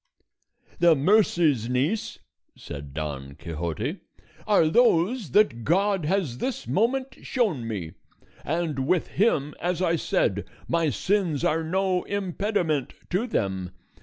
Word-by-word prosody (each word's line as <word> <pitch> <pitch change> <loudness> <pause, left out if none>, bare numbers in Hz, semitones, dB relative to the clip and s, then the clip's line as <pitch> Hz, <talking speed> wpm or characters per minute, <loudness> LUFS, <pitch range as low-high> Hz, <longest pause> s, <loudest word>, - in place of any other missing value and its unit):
"The 170 -2 +6
mercies, 155 - +3
niece," 140 - -1 0.4
said 70 -1 -8
Don 70 -3 -5
Quixote, 85 - -4 0.5
"are 200 -7 +4
those 210 - +3
that 125 - +3
God 190 - +2
has 160 -8 -1
this 265 - -3
moment 260 +6 0
shown 190 - -1
me, 95 -8 -4 0.5
and 155 -4 -1
with 180 0 +1
him, 150 -9 +1
as 175 0 -1
I 170 -2 +2
said, - - 0 0.2
my 165 -2 +1
sins 175 - 0
are 160 +1 +1
no 185 +2 0
impediment 190 - -1 0.2
to 195 +8 0
them. 95 - -2
165 Hz, 120 wpm, -25 LUFS, 125-200 Hz, 0.5 s, The